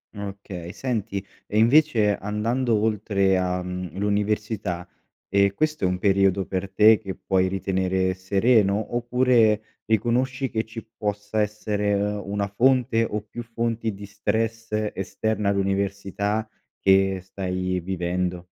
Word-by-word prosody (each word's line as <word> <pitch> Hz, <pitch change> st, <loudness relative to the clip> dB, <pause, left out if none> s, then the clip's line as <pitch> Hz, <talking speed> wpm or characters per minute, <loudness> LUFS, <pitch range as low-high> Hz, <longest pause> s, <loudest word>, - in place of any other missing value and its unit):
Okay. 100 Hz, -3 st, -7 dB
Senti 110 Hz, -5 st, -3 dB, 0.2 s
e 105 Hz, -, 0 dB
invece 115 Hz, -4 st, +4 dB
andando 115 Hz, +4 st, 0 dB
oltre 100 Hz, -3 st, +1 dB
a, 90 Hz, 0 st, 0 dB
mhmm, 90 Hz, -2 st, -5 dB
l'università, 105 Hz, -3 st, -1 dB, 0.4 s
ehm, 100 Hz, 0 st, +3 dB
questo 155 Hz, -1 st, -1 dB
è -, -, +4 dB
un 90 Hz, 0 st, -1 dB
periodo 95 Hz, -1 st, +3 dB
per 95 Hz, 0 st, -3 dB
te 110 Hz, +2 st, +6 dB
che 95 Hz, -2 st, -6 dB
puoi 95 Hz, -1 st, +1 dB
ritenere 95 Hz, -1 st, 0 dB
sereno, 100 Hz, +3 st, +2 dB
oppure 120 Hz, -3 st, +3 dB, 0.2 s
riconosci 125 Hz, +4 st, +1 dB
che 110 Hz, -1 st, -1 dB
ci 115 Hz, 0 st, -8 dB
possa 105 Hz, 0 st, -2 dB
essere 105 Hz, -1 st, -1 dB
una 100 Hz, 0 st, -1 dB
fonte 115 Hz, +1 st, +2 dB
o 105 Hz, 0 st, -3 dB
più 120 Hz, +3 st, -8 dB
fonti 115 Hz, -1 st, -2 dB
di 100 Hz, +1 st, -9 dB
stress 110 Hz, +2 st, -2 dB, 0.2 s
esterna 105 Hz, +2 st, -1 dB
all'università 100 Hz, +2 st, -1 dB, 0.3 s
che 95 Hz, 0 st, +3 dB
stai 95 Hz, -1 st, -3 dB
vivendo? 90 Hz, 0 st, -2 dB
100 Hz, 125 wpm, -24 LUFS, 95-110 Hz, 0.4 s, te